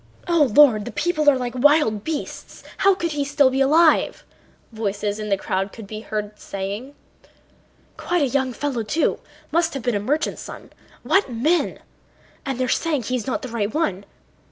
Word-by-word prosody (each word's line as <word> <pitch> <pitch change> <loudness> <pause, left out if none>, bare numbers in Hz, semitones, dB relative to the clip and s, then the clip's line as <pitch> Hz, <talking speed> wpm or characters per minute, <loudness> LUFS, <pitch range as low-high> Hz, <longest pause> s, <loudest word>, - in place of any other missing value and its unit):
"O 320 -7 +3
Lord! 245 -9 +6
The 240 - -6
people 305 +3 +2
are 275 - +3
like 245 -1 -4
wild 255 -5 +3
beasts! 320 -2 -6
How 395 0 +4
could 340 -3 -2
he 290 -1 -1 0.3
be 265 +1 0
alive?" 310 +4 +3 0.5
voices 205 -1 -3
in 210 0 -4
the 195 - +2
crowd 190 +1 -2
could 225 - -10
be 215 +2 -7
heard 210 -1 -5
saying. 200 +8 -6 1.0
"Quite 350 -3 0
a - - +2
young 265 0 0
fellow 265 -1 -2
too... 290 +10 0 0.3
must 335 -2 +1
have 270 - -4
been 245 - 0
a 205 - 0
merchant's 295 +10 -1
son. - - -10 0.3
What 385 -9 +2
men!... 300 +10 0 0.7
and 270 -2 -2
they 255 - 0
say 300 +3 0
he's 250 0 -3
not 260 - -2
the 260 - -5
right 220 -3 -2
one.... 205 - -1
255 Hz, 175 wpm, -22 LUFS, 215-300 Hz, 1.0 s, Lord